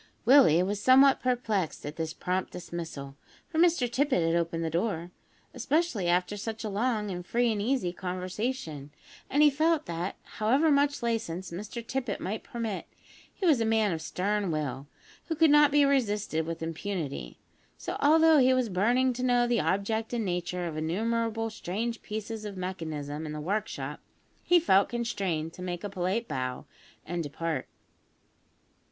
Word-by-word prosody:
Willie 240 - +6
was 200 +2 -2
somewhat 265 +2 +6
perplexed 225 -9 -1
at 150 +1 -5
this 160 -1 -3
prompt 180 +2 -2
dismissal 165 -6 -7 0.3
(for 320 -3 -2
Mr 335 -7 +4
Tippet 255 - +1
had 165 +1 +2
opened 165 -1 -1
the 160 - -2
door), 175 -1 -1 0.4
especially 260 - 0
after 180 +3 +1
such 225 +2 -5
a 215 - -2
long 210 0 -1
and 180 -1 -5
free 235 +5 +1
and 210 -2 -1
easy 230 -6 0
conversation, 185 - -4 0.4
and 290 +2 +4
he 295 - +7
felt 310 +2 +2
that, 170 +3 -3
however 265 +9 +2
much 285 -2 +2
license 190 -7 -2
Mr 215 +6 -6
Tippet 250 -4 -3
might 210 +4 -3
permit, 225 -4 -4 0.4
he 390 - -4
was 295 -9 +4
a - - +3
man 220 -2 +2
of 160 -2 -3
stern 200 +4 -1
will, 145 -3 -3 0.4
who 325 - -2
could 320 -1 +5
not 295 0 +6
be 290 0 +5
resisted 210 - 0
with 165 0 -4
impunity; 165 - -4 0.4
so, - - -5
although 320 +1 +6
he 260 0 +5
was 255 -3 +1
burning 240 +7 +2
to 245 - -5
know 245 -1 +3
the 240 -1 +1
object 220 +4 -1
and 230 -3 -1
nature 180 0 -2
of 165 -2 -4
innumerable 225 +7 -1
strange 220 +4 -3
pieces 215 +1 -5
of 205 -2 -6
mechanism 160 -5 -4
in 150 - -5
the 150 - -5
workshop, 200 +7 -3 0.4
he 350 0 +4
felt 200 - +4
constrained 190 -9 -2
to - - -11
make 175 -1 -4
a 205 - -4
polite 195 +5 -1
bow 130 -1 -3 0.4
and 175 +1 -3
depart. 160 +2 -3
205 Hz, 165 wpm, -29 LUFS, 170-245 Hz, 0.4 s, he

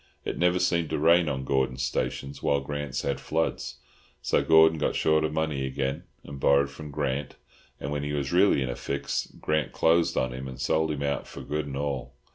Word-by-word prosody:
It - - -2
never 90 +1 +3
seemed 85 -3 +1
to - - -1
rain 85 +2 +4
on 65 -2 -2
Gordon's 65 -1 0
stations, 70 +2 -3
while 70 - +2
Grant's 70 -1 -4
had 70 -1 -1
floods. 80 +4 -2 0.4
So - - +1
Gordon 80 0 +6
got 75 - 0
short 80 0 +3
of 80 - 0
money 75 -3 -1
again 70 +5 -2 0.2
and 70 -1 -9
borrowed 70 +1 +3
from 75 +1 -9
Grant, 70 -1 -2 0.4
and 70 - -4
when 75 -1 -1
he 75 0 -3
was 70 0 -2
really 90 -6 +4
in 65 - -3
a - - -4
fix 70 0 -3
Grant 75 0 -1
closed 85 +1 +3
on 65 -1 0
him 65 +1 -6
and 65 -1 -8
sold 80 0 +1
him 75 -2 -2
out 70 0 -2
for - - -9
good 75 0 -3
and 70 -1 -5
all." 70 -2 -3
70 Hz, 210 wpm, -27 LUFS, 70-80 Hz, 0.4 s, Gordon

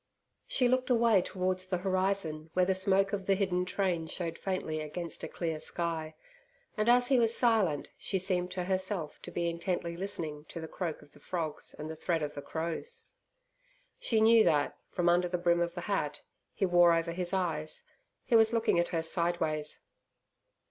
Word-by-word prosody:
She 250 - +2
looked 255 +1 +1
away 230 -5 +4
towards 185 0 -2
the 185 -1 0
horizon 185 -4 -1
where 180 0 +3
the 190 - +2
smoke 195 +1 +2
of 195 -2 -3
the 195 - +4
hidden 185 -2 0
train 185 -3 -1
showed 165 0 -4
faintly 185 -5 -2
against 165 +2 -5
a - - -2
clear 160 -3 -3
sky, 160 -1 -2 0.6
and 215 0 +1
as 245 0 +5
he 265 -3 +5
was 230 0 +3
silent, 215 - +2
she 195 - -1
seemed 180 -1 -1
to 180 - -2
herself 185 -3 -2
to - - -8
be 170 0 -1
intently 170 0 -2
listening 160 -5 -4
to 170 - -8
the 160 - -6
croak 165 -2 -4
of - - -21
the - - -17
frogs 160 -1 -4
and 150 - -6
the 160 - -5
threat 165 0 -1
of 150 0 -3
the 145 - -6
crows. 170 - -4 0.9
She 230 - +1
knew 225 0 +7
that, 145 -6 +2
from 175 -1 -1
under 175 +1 +4
the 180 0 -1
brim 175 0 +2
of 170 0 -1
the 175 - -4
hat 150 -6 -2 0.3
he - - 0
wore 175 -1 +6
over 165 0 0
his 175 0 -2
eyes, 165 -5 -2 0.4
he 240 - +2
was 225 0 +5
looking 230 -6 +2
at 175 - +2
her 165 -2 -1
sideways. 160 -3 -1
180 Hz, 190 wpm, -31 LUFS, 165-195 Hz, 0.9 s, knew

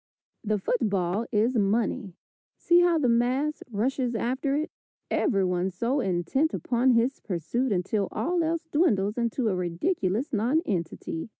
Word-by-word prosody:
The 215 -1 0
football 200 -1 0
is 230 +3 +2
money. 205 -1 0 0.4
See 345 0 +4
how 350 -1 +4
the 285 -5 +1
mass 250 +6 +1
rushes 245 +3 -1
after 260 +5 -1
it! 310 +3 -2 0.4
Everyone 190 - +1
so 235 +9 -1
intent 195 - 0
upon 250 +1 +2
his 240 +4 +1
pursuit 210 - -2
until 195 +2 0
all 345 +1 0
else 330 0 -1
dwindles 210 - +2
into 235 +1 0
a 200 - +1
ridiculous 190 - -1
nonentity. 210 - -1
235 Hz, 130 wpm, -27 LUFS, 195-270 Hz, 0.4 s, See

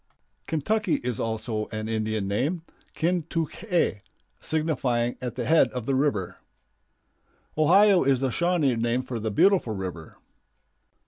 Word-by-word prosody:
Kentucky 195 +5 0
is 125 -2 -2
also 110 -1 -2
an 110 0 -5
Indian 110 -2 -2
name, 145 - -1 0.3
"Kin 175 +2 +1
tuk 165 +3 -3
ae," 175 - +1 0.4
signifying 130 -7 0
"at 125 -2 -4
the 125 - -3
head 160 0 +5
of 125 -3 -4
the 135 - 0
river." 130 -10 0 1.2
Ohio 185 +5 +5
is 135 -2 +2
the 135 -1 0
Shawnee 170 -5 +1
name 120 +2 0
for 125 -2 -5
"the 110 0 -2
beautiful 120 - +3
river." 90 -5 -7
125 Hz, 135 wpm, -26 LUFS, 110-165 Hz, 1.2 s, head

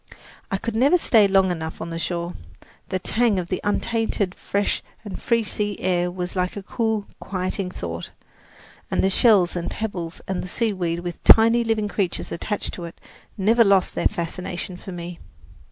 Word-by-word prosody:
I 195 - 0
could 230 +3 -4
never 275 +10 +5
stay 225 - +5
long 190 -1 +4
enough 160 -2 -4
on 165 +1 -5
the 165 - -3
shore. 170 0 -3 0.6
The 185 - 0
tang 220 +3 +1
of 175 -1 -3
the 185 - -2
untainted, 215 -2 0
fresh 200 +1 -1 0.2
and 200 - -6
free 230 -1 +2
sea 205 -1 -2
air 180 -1 +1
was 180 0 -4
like 180 +2 -1
a 200 - -5
cool, 220 -1 -1
quieting 185 0 -2
thought, 85 - -6 0.8
and - - +1
the 190 - +3
shells 195 -5 +5
and 175 -1 -2
pebbles 180 -6 -4
and 190 -1 -2
the - - -6
seaweed 180 -6 -1
with 175 -1 -6
tiny 230 +1 +7
living 220 -2 0
creatures 195 -3 -2
attached 205 +4 -3
to 175 - -6
it 170 - -10 0.4
never 225 +4 +5
lost 195 -3 +3
their - - +2
fascination 175 +1 -4
for 190 - -9
me. 175 -1 -7
190 Hz, 175 wpm, -23 LUFS, 175-215 Hz, 0.8 s, tiny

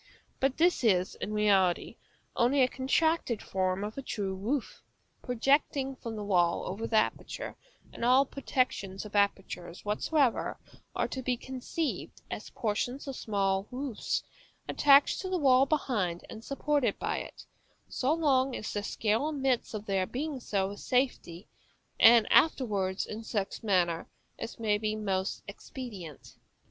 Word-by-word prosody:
But 270 0 +1
this 345 -3 +3
is, 185 -5 +3
in - - -5
reality, 200 -4 +2 0.4
only 260 +3 +4
a - - +5
contracted 270 -2 +1
form 185 +1 -1
of 215 +5 -5
a - - -3
true 200 -7 -3
roof, 225 +8 -3 0.4
projecting 270 +2 +1
from 230 -3 -6
the 210 - -5
wall 175 -4 +2
over 215 +5 -4
the 225 - -1
aperture; 215 - -1 0.4
and - - -7
all 255 +3 +5
protections 250 -8 -2
of 210 - -9
apertures 195 -3 -1
whatsoever 250 +5 +1 0.4
are - - +1
to 260 - -4
be 250 -1 -1
conceived 265 +5 -4
as - - -5
portions 245 +5 -2
of 270 - -4
small 195 -3 0
roofs, 260 -2 -3 0.4
attached 280 -1 +5
to 375 - -4
the 370 - 0
wall 270 -3 +5
behind; 210 - -1
and 220 - -9
supported 280 0 0
by - - -2
it, - - -10 0.4
so 265 +2 0
long 275 -5 +2
as 215 - -5
their 205 - -1
scale 220 +7 0
admits 270 -6 0
of 210 0 -5
their 195 -2 0
being 285 +1 -3
so 195 -5 -1
with 205 - -8
safety, 250 -8 -1 0.5
and 230 -1 +8
afterwards 205 -11 +3
in 220 +1 -7
such 205 -3 -3
manner 175 -6 +1 0.3
as 230 - -6
may 210 -2 +1
be 215 0 -1
most 195 -3 -2
expedient. 200 - -9
225 Hz, 150 wpm, -30 LUFS, 200-265 Hz, 0.5 s, and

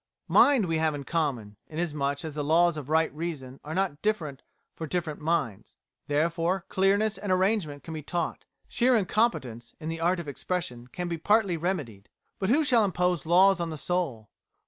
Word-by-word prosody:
Mind 270 -8 +5
we 165 -2 0
have 160 -2 +1
in 140 - -6
common, 130 -10 -2
inasmuch 150 -3 -2
as 155 - -5
the 150 0 -3
laws 170 +3 +3
of 150 -2 -7
right 160 +1 +2
reason 150 -5 -5
are 155 +3 -5
not 185 -6 -1
different 165 -11 -1 0.3
for 160 - -6
different 160 -3 -3
minds. 150 - -2 0.3
Therefore 165 +5 0
clearness 200 +3 +2
and 205 - -3
arrangement 185 -6 +1
can 165 - -7
be 155 - -5
taught, 170 +2 -3 0.2
sheer 250 +1 +3
incompetence 185 - 0
in 160 -1 -5
the 165 0 -4
art 175 +2 +1
of 170 - -6
expression 140 -5 -4
can 175 +8 -5
be 170 -1 -3
partly 205 0 +3
remedied. 155 - -3 0.3
But 190 - -1
who 295 +6 +4
shall 245 -6 +4
impose 180 -5 0
laws 190 +3 +5
on 170 -1 -2
the 155 - -5
soul? 145 - -2
165 Hz, 180 wpm, -27 LUFS, 145-185 Hz, 0.3 s, Mind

